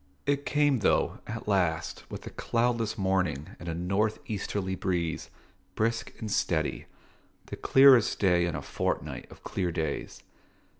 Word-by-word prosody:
It 140 0 0
came, 145 -3 +3
though, 100 - +2
at 115 0 -6
last, 85 -5 0
with - - -7
a - - -7
cloudless 115 -2 0
morning 95 -7 0
and 85 - -6
a 80 - -2
north 100 +5 0
easterly 100 -4 -3
breeze, 90 -3 -2 0.5
brisk 115 +1 0
and 110 -2 -4
steady, 80 -5 0 0.6
the - - -6
clearest 135 -4 +6
day 90 -3 +3
in 85 - -3
a - - -4
fortnight - - -3
of - - -15
clear 90 -3 -2
days. 80 -1 -3
95 Hz, 145 wpm, -29 LUFS, 85-115 Hz, 0.6 s, clearest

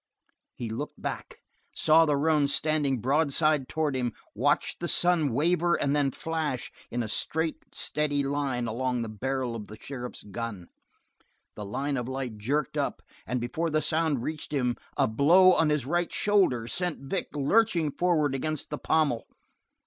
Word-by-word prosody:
He 120 - -5
looked 145 +7 -5
back, - - -6 0.3
saw 160 +1 +5
the 145 -1 +2
roan 150 -1 +3
standing 145 -4 +1
broadside 145 +1 +2
towards 155 -3 -1
him, 120 -2 -1 0.2
watched - - +1
the 175 - -2
sun 170 -5 +2
waver 170 +6 +2
and 140 +1 0
then 145 -2 +2
flash 150 -3 -3 0.2
in 120 0 -2
a - - -4
straight 160 +8 -2
steady 145 -2 +1
line 135 -3 -1
along 125 +1 -1
the 115 - -5
barrel 130 +2 -2
of 105 -3 -7
the 110 - -10
sheriff's 125 -2 -7
gun. 105 -3 -6 0.9
The 105 - -6
line 135 +7 -2
of 125 0 -3
light 130 -5 -4
jerked 140 +6 -1
up, - - -2 0.2
and 125 - -1
before 140 +8 -2
the 155 0 +2
sound 155 -5 +1
reached 155 +1 -5
him 125 -4 0 0.2
a - - +3
blow 165 - +6
on 160 -3 +3
his 150 -4 0
right 175 +4 0
shoulder 185 - +2
sent 175 +4 -2
Vic 160 +8 -2
lurching 165 +1 +2
forward 155 -4 +1
against 155 +3 -2
the 150 - -3
pommel. 150 -7 +1
145 Hz, 165 wpm, -28 LUFS, 125-160 Hz, 0.9 s, blow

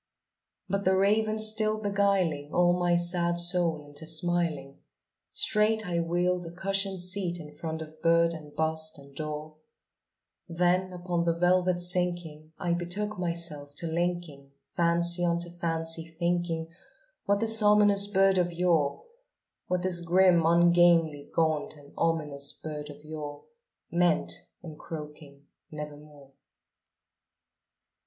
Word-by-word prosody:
'" - - -60
But 200 0 -2
the 190 0 +2
Raven 215 +2 +2
still 215 0 +3
beguiling 195 -8 0
all 175 0 +3
my 175 -1 +1
sad 175 0 0
soul 175 -3 +1
into 145 +2 -6
smiling, 165 -4 0 0.5
Straight 220 - +1
I 170 -1 -1
wheeled 175 +2 0
a - - -8
cushioned 195 +1 -1
seat 180 -2 -2
in 150 -2 -10
front 160 +1 -5
of 155 0 -15
bird 170 0 +3
and 150 -2 -11
bust 160 0 0
and 140 -1 -16
door; 155 +1 -6 0.9
Then, 180 +2 +1
upon 175 -1 -2
the 170 -1 +1
velvet 180 +1 +2
sinking, 175 -3 -3
I 175 -1 -1
betook 180 +4 -3
myself 170 -5 -4
to - - -4
linking 170 -4 -3 0.2
Fancy 170 +1 +1
unto 170 0 0
fancy, 165 -1 -3
thinking 170 -1 -1 0.6
what 200 0 +2
this 225 0 +6
ominous 205 -1 +5
bird 195 -1 +3
of 175 -1 0
yore 170 -4 0 0.6
What 180 -1 -1
this 185 -2 +3
grim, 175 0 +4
ungainly, 170 -3 +3
gaunt, 160 -2 0
and 145 -1 -17
ominous 150 -4 0
bird 150 -1 -7
of 145 0 -12
yore 150 -2 -7 0.5
Meant 170 - +1 0.3
in 155 -3 -9
croaking 150 -3 -10 0.2
"Nevermore." 150 -2 -10
170 Hz, 130 wpm, -28 LUFS, 155-180 Hz, 0.9 s, this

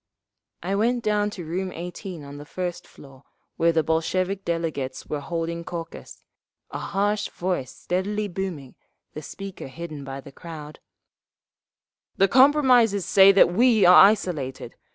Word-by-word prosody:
I 190 +3 -2
went 235 +4 +1
down 210 -1 +1
to 180 -5 -8
room 185 +4 -3
18 175 -1 -7
on 140 0 -10
the 145 - -9
first 175 +3 -5
floor 135 -1 -16 0.3
where 170 +1 +3
the 160 -1 +1
Bolshevik 185 +5 -1
delegates 165 -6 -3
were 150 - -4
holding 170 +3 -4
caucus, 165 -1 -8 0.5
a - - -5
harsh 205 +1 -1
voice 175 -8 -3
steadily 205 +4 -3
booming, 175 -8 -6 0.4
the 155 - -7
speaker 195 +3 -8
hidden 155 0 -8
by 135 0 -7
the 140 - -12
crowd: 155 -1 -10 1.4
"The 195 - +4
compromisers 250 - +4
say 195 0 +7
that 185 -2 +5
we 225 -1 +4
are 180 +2 +9
isolated. 175 -11 -1
180 Hz, 140 wpm, -24 LUFS, 155-200 Hz, 1.4 s, are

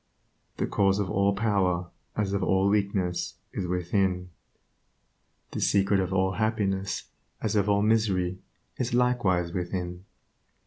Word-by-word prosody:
The - - 0
cause 100 -1 +2
of 100 -3 -1
all 100 +1 +2
power, 95 -5 +1 0.3
as 100 -2 0
of 100 - 0
all 95 +1 +2
weakness, 100 -3 0 0.2
is 90 - -2
within; 90 0 0 1.2
the - - -4
secret 100 0 +3
of 95 -1 -1
all 95 0 +2
happiness 100 -1 -1 0.4
as 110 -1 -1
of 105 0 +2
all 100 0 +3
misery 95 -5 +1 0.4
is 120 -1 -1
likewise 100 -9 +2
within. 90 0 -4
95 Hz, 130 wpm, -27 LUFS, 90-105 Hz, 1.2 s, secret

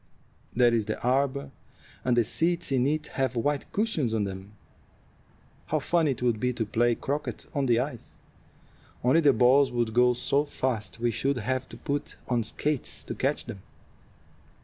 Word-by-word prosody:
There's 120 -3 +4
the 110 - -2
arbor, 135 +2 +1 0.5
and 125 -1 +2
the 120 - +5
seats 170 +8 0
in 130 -1 +2
it 155 +1 0 0.2
have 130 -1 0
white 145 +4 -1
cushions 160 - 0
on 110 - +1
them. 95 +1 -6 1.1
How - - +1
funny 170 -3 +1
it 125 -2 -2
would 120 -3 +2
be 125 +1 0
to 115 -2 -2
play 120 +3 +2
croquet 145 +5 -4
on 140 -2 0
the 120 -2 +4
ice! 125 -2 -5 0.9
Only 130 +7 +4
the 145 -3 +6
balls 130 +3 +4
would 120 -2 -1
go 125 +1 +4
so 140 +4 +1
fast 115 -9 -3
we 120 0 +1
should 135 +5 0
have 130 +3 -2
to - - -9
put 145 +1 -3
on 120 -2 +1
skates 140 +5 -2
to - - -5
catch - - -1
them. 100 - -8
125 Hz, 170 wpm, -27 LUFS, 115-140 Hz, 1.1 s, the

